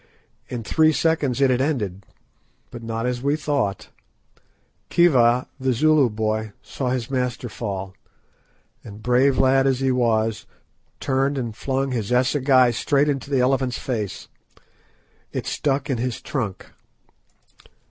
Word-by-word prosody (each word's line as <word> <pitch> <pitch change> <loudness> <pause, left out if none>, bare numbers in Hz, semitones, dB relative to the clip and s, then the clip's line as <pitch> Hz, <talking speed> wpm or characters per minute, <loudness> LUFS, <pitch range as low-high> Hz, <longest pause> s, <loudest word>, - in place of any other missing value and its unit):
In 120 -2 -4
three 155 +7 +3
seconds 145 -5 0
it 135 -2 +4
had 125 0 +1
ended, 105 - -2 0.6
but 120 - -8
not 115 0 -3
as 125 -1 -2
we 140 +2 +1
thought. 145 -10 -2 1.0
Khiva, 125 -8 +4
the 130 -1 +1
Zulu 150 +1 +4
boy, 110 0 -2
saw 130 -2 -4
his 125 -1 -2
master 125 -2 -2
fall, 95 -4 -5 0.9
and 105 0 -11
brave 130 +2 +3
lad 135 +1 +4
as 130 -2 +1
he 135 -1 +1
was, 115 -3 0 0.5
turned 135 +1 0
and 120 -4 -4
flung 135 +2 -2
his 115 -3 -3
assegai 130 0 +3
straight 140 +5 +1
into 140 -2 -3
the 135 -3 +2
elephant's 130 -1 +1
face. 110 -6 -4 1.0
It - - -4
stuck 140 -1 -1
in 130 -4 -1
his 125 -1 -2
trunk. 110 -9 -4
125 Hz, 135 wpm, -22 LUFS, 115-135 Hz, 1.0 s, it